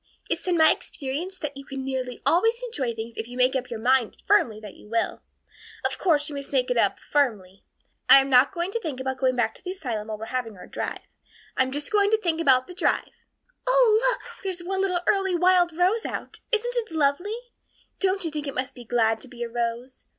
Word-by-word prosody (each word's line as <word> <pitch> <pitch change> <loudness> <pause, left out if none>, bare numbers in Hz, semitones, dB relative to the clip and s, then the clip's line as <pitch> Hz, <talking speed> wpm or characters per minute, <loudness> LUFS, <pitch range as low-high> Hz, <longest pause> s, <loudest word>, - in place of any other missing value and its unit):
It's - - -1
been 360 -2 +1
my 315 -1 +7
experience 310 +7 -4
that 290 -4 -5
you 275 - -8
can 270 -1 -6
nearly 255 -2 -4
always 450 +7 +3
enjoy 270 - -2
things 225 +1 -7
if 225 - -4
you 245 +1 -9
make 255 +1 +3
up 255 -1 -2
your 230 - -5
mind 250 0 +2
firmly 245 - +3
that 210 -2 -10
you - - -16
will. 230 0 -1 0.6
Of - - -1
course, 300 -5 +2
you 300 - -6
must 280 0 -6
make 255 -3 +1
it 245 - +1
up 205 -4 +2
firmly. 210 -10 0 0.5
I - - +11
am 270 - 0
not 260 0 +5
going 350 0 -3
to 465 - -1
think 310 - -5
about 260 0 -3
going 255 -1 +2
back 225 -2 +1
to - - -17
the 365 - -5
asylum 245 - -4
while 215 -1 -4
we're 220 - -6
having 230 -4 -4
our 180 - -10
drive. - - -4 0.5
I'm 260 0 +2
just 290 +5 -4
going 410 -1 +4
to 440 - +4
think 330 -5 0
about 260 -4 +4
the 360 - -10
drive. 360 - 0 0.6
Oh, - - +5
look, - - -2 0.2
there's 375 -2 -4
one 380 +2 -1
little 365 -3 0
early 385 -2 +2
wild 350 -1 +3
rose 385 +6 +2
out! - - -5
Isn't 475 +2 +1
it 465 -2 -1
lovely? 320 +7 +1 0.6
Don't 385 -1 0
you 325 - -2
think 300 -1 -4
it 275 - -5
must 255 0 -2
be 245 - -11
glad 225 -1 +1
to - - -11
be 240 -1 -7
a 235 - -4
rose? 235 +2 -4
275 Hz, 230 wpm, -25 LUFS, 245-365 Hz, 0.6 s, I